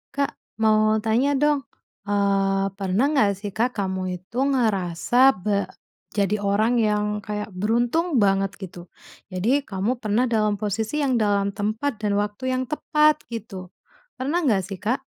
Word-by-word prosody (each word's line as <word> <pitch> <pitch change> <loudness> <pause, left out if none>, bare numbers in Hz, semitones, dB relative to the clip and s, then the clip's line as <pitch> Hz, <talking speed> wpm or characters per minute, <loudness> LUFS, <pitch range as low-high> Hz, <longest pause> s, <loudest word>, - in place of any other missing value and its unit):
Kak, 280 0 0 0.3
mau 215 0 +4
tanya 245 +6 +2
dong. 290 0 +2 0.4
Eee, 195 -1 +1
pernah 195 +5 +1
nggak 215 -9 +3
sih 200 +1 -6
Kak, 235 +5 -1
kamu 190 -2 -2
itu 190 +7 -12
ngerasa 220 -3 +1
be 200 +2 -1 0.5
jadi 205 +1 +1
orang 205 +4 +1
yang 210 -1 +1
kayak 210 0 -5
beruntung 240 - 0
banget 195 0 +1
gitu? 180 -2 -9 0.4
Jadi 225 +11 +1
kamu 210 +5 -2
pernah 215 +1 +1
dalam 215 -3 +1
posisi 220 +8 -2
yang 265 - +1
dalam 200 -1 +1
tempat 215 +5 -2
dan 205 -1 0
waktu 205 +4 -2
yang 255 - -1
tepat 300 0 +2
gitu. 215 -5 -7 0.5
Pernah 280 +7 0
nggak 200 -6 +2
sih, 195 -1 -7
Kak? 245 +6 -1
210 Hz, 145 wpm, -23 LUFS, 195-245 Hz, 0.5 s, mau